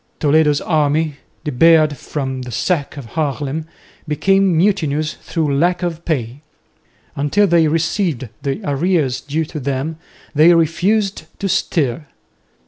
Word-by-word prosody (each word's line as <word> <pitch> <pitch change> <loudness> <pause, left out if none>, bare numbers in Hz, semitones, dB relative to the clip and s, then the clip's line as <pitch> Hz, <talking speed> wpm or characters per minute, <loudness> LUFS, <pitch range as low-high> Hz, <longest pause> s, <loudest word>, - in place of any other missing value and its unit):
Toledo's 150 -1 +3
army, 155 -1 +1 0.3
debarred 155 +1 +4
from 130 -1 -4
the 125 - -7
sack 150 0 -1
of 140 - -7
Haarlem, 150 +1 -2 0.4
became 190 +3 +2
mutinous 155 -5 +1
through 155 -5 -2
lack 175 +5 +1
of 170 -1 -3
pay. 130 -4 -2 0.7
Until 145 +9 +2
they 170 -4 +4
received 160 - -1
the 140 -2 -3
arrears 145 -3 0
due 155 +4 -2
to 150 0 -7
them, 140 +3 -3 0.4
they 160 +4 +6
refused 180 +4 +1
to 200 - -2
stir. 150 -6 0
155 Hz, 125 wpm, -18 LUFS, 140-170 Hz, 0.7 s, they